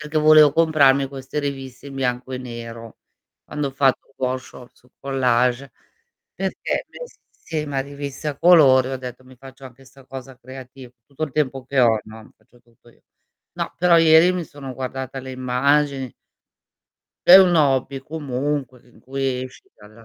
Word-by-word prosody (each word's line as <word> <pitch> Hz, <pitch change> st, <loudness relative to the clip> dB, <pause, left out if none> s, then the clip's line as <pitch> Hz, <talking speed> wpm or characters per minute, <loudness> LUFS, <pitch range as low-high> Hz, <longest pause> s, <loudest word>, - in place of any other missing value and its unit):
perché 150 Hz, +1 st, -2 dB
volevo 155 Hz, -1 st, +6 dB
comprarmi 140 Hz, -4 st, +3 dB
queste 135 Hz, +1 st, -7 dB
riviste 135 Hz, -2 st, -6 dB
in 140 Hz, -, -9 dB
bianco 130 Hz, -1 st, -3 dB
e 125 Hz, -, -4 dB
nero, 115 Hz, -2 st, -9 dB, 0.5 s
quando 150 Hz, -2 st, -4 dB
ho -, -, -7 dB
fatto 135 Hz, 0 st, 0 dB
workshop 130 Hz, -1 st, -5 dB
su 125 Hz, -, -27 dB
collage, 125 Hz, -1 st, 0 dB, 0.6 s
perché -, -, -3 dB
me -, -, -13 dB, 0.5 s
sì, 155 Hz, -2 st, -4 dB
ma 140 Hz, -2 st, -2 dB
riviste 140 Hz, +1 st, -6 dB
a 145 Hz, -, -5 dB
colori 140 Hz, -7 st, +5 dB
ho 135 Hz, -, -3 dB
detto: 125 Hz, 0 st, -9 dB
"Mi 130 Hz, 0 st, -17 dB
faccio 135 Hz, +1 st, -14 dB
anche 130 Hz, +1 st, -14 dB
'sta 135 Hz, +1 st, -19 dB
cosa 130 Hz, -1 st, -10 dB
creativ" 130 Hz, 0 st, -12 dB, 0.2 s
tutto 140 Hz, +2 st, -9 dB
il 145 Hz, -, -11 dB
tempo 135 Hz, -3 st, -2 dB
che 135 Hz, 0 st, 0 dB
ho, 115 Hz, -2 st, +4 dB
no, 110 Hz, 0 st, -14 dB
faccio 120 Hz, -, -27 dB
tutto 120 Hz, 0 st, -26 dB
io. -, -, -28 dB, 0.5 s
No, -, -, -4 dB
però 170 Hz, -1 st, +5 dB
ieri 165 Hz, +2 st, +6 dB
mi 180 Hz, -2 st, -3 dB
sono 140 Hz, -3 st, -10 dB
guardata 130 Hz, +1 st, -6 dB
le 130 Hz, 0 st, -9 dB
immagini 130 Hz, +1 st, 0 dB, 1.1 s
È 180 Hz, -, +11 dB
un 185 Hz, -2 st, +6 dB
hobby 135 Hz, -3 st, +1 dB
comunque 140 Hz, -3 st, -4 dB
in 120 Hz, -, -22 dB
cui 130 Hz, +1 st, -3 dB
esci 130 Hz, -, -13 dB
dalla 110 Hz, +2 st, -17 dB
135 Hz, 165 wpm, -21 LUFS, 125-145 Hz, 1.1 s, È